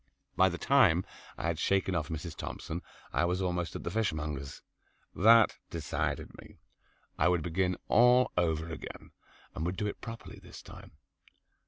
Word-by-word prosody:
By 95 0 +5
the 90 - -4
time 100 -9 +4 0.3
I - - -4
had 85 -2 -1
shaken 95 -1 +1
off 80 -4 -1
Mrs. 80 +1 -5
Thompson 85 +3 -5 0.3
I - - +2
was 90 +1 0
almost 90 -3 -2
at - - -5
the 85 - -3
fishmonger's. 75 -9 -3 0.5
That 115 +3 +6
decided - - -3
me. - - -16 0.6
I 80 - +4
would 90 -3 +2
begin 90 +2 0
all 125 +2 +5
over 80 -2 0
again, 80 - -8 0.4
and 75 - -4
would 90 +2 -2
do 105 - -1
it 105 - -4
properly 115 -1 -8
this - - -12
time. - - -13
90 Hz, 160 wpm, -31 LUFS, 80-100 Hz, 0.6 s, That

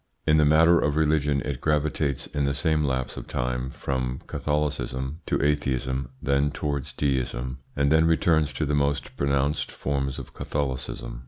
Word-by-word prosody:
In 80 0 +4
the 75 - +5
matter 80 +3 +6
of 75 0 +1
religion 75 -2 +2
it 70 -2 -3
gravitates 75 -2 0
in 70 -1 -1
the 70 0 0
same 75 +3 +1
lapse 65 -3 -1
of - - -7
time 60 +1 -2
from 65 -1 -3
Catholicism 75 -1 -2
to - - +1
atheism, 65 -3 0
then 70 0 +2
towards 70 -1 -3
deism, 65 -2 -1 0.2
and 70 0 +2
then 80 +1 +5
returns 80 -2 +3
to 75 - -1
the 75 - -1
most 70 -2 0
pronounced 70 +1 0
forms 70 -1 -2
of - - -9
Catholicism. 65 -4 -4
70 Hz, 160 wpm, -26 LUFS, 65-75 Hz, 0.2 s, matter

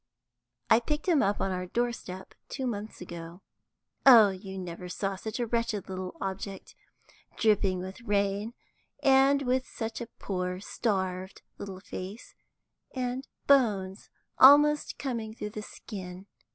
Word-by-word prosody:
I 225 - +6
picked 300 +7 -3
him 325 -6 +4
up 200 0 +1
on 195 - 0
our 180 0 -3
door 240 +5 0
step, 190 -4 -9 0.2
two 265 - -4
months 215 -4 -5
ago. 170 0 -9 0.6
Oh, 230 -6 +9
you 190 0 -8
never 180 -1 -6
saw 195 +2 -2
such 220 +4 -5
a 240 - +1
wretched 230 -3 -1
little 185 -1 -5
object, 195 0 -5 0.6
dripping 200 -4 +2
with 190 +6 -8
rain, 205 +1 0 0.5
and 275 +1 +5
with 255 0 0
such 225 +1 -5
a 235 - -5
poor 180 -1 -3
starved 190 -3 -2 0.2
little 195 -2 -7
face, 200 +4 -8 0.6
and 255 +1 -3 0.2
bones 205 -9 +2 0.3
almost 295 +2 +7
coming 230 -5 -4
through 210 -2 -5
the 215 - -6
skin. 190 -3 -9
205 Hz, 140 wpm, -29 LUFS, 190-240 Hz, 0.6 s, Oh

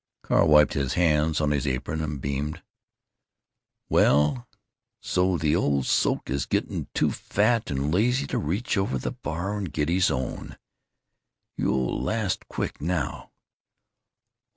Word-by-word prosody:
Carl - - +3
wiped 75 -1 +6
his 70 -1 -1
hands 80 -2 +2
on 75 -1 +1
his 75 0 0
apron 70 +4 -2
and 75 -2 -3
beamed: 70 +3 -3 1.2
"Well, 70 -3 +3 0.5
so 90 0 +1
the 75 0 +1
old 70 -6 +1
soak - - +1
is 70 +1 -2
getting - - -2
too - - +2
fat 115 +2 0
and 70 +2 -1
lazy 125 +8 +2
to - - -2
reach 100 - -1
over 95 -9 -1
on 65 - -3
the - - -3
bar 85 +7 -4
and 95 -6 -4
get 75 +1 -1
his 90 +2 +3
own! 65 0 -4 1.0
You'll 65 -2 0
last 110 -4 -2
quick - - -4
now!" 80 -3 -2
75 Hz, 140 wpm, -26 LUFS, 70-90 Hz, 1.2 s, wiped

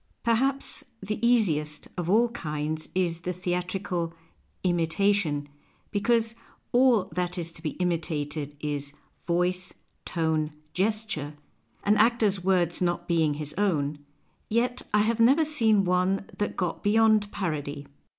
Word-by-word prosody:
Perhaps 265 +4 0 0.2
the 210 +3 -4
easiest 155 -11 +2
of 175 -2 -3
all 230 +5 +4
kinds 155 -7 -4
is 175 -3 0
the 180 +1 -2
theatrical 180 -1 -2 0.2
" - - -40
imitation," 170 -3 +1 0.4
because 225 +2 +1 0.4
all 245 -4 +5
that 180 0 -2
is 170 -1 -3
to 165 - -10
be 155 -2 -3
imitated 155 -4 -2
is 145 -1 -3 0.3
voice, 180 +1 0 0.3
tone, 160 -2 0 0.2
gesture 195 -7 -1 0.2
— - - -38
an 210 +1 +3
actor's 215 -4 +3
words 180 -2 +2
not 175 -1 0
being 160 -4 +2
his 150 0 -5
own 150 -7 +1 0.2
— - - -41
yet 245 +3 +1
1 210 0 +3
have 230 +1 0
never 270 +8 +5
seen 220 -10 +3
one 185 +2 +1
that 205 - -2
got 180 -3 -2
beyond 215 -1 +4
parody. 145 -6 -3
180 Hz, 135 wpm, -27 LUFS, 160-215 Hz, 0.4 s, all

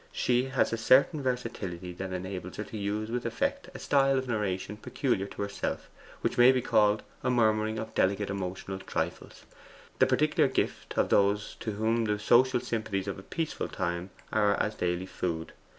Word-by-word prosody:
She 125 +1 +1
has 130 -3 +1
a - - 0
certain 140 +6 +4
versatility 110 -9 -3
that 95 +1 -5
enables 95 0 -5
her 105 - -2
to 105 - -10
use 105 +2 -2
with 125 +1 -1
effect 280 0 -2
a - - -4
style 135 -1 +3
of 130 0 -2
narration 105 -3 -2
peculiar 105 -4 -1
to 100 - -5
herself, 100 0 -4 0.3
which - - -1
may 120 +2 +9
be 130 - +2
called 105 -3 +3 0.2
a 125 - +1
murmuring 110 -2 +2
of 110 0 -5
delicate 100 +1 +1
emotional 95 0 -4
trifles, - - -4 0.5
the - - +6
particular - - +3
gift - - -2
of - - +2
those 100 +1 +2
to 110 - -3
whom 110 +2 +1
the 105 -1 0
social 125 +4 +4
sympathies 110 -5 -2
of 100 - -4
a - - -8
peaceful 160 - -3
time 85 0 -3 0.2
are 105 -1 +3
as 105 - 0
daily 90 -2 -1
food. 85 -3 -3
105 Hz, 180 wpm, -29 LUFS, 95-120 Hz, 0.5 s, may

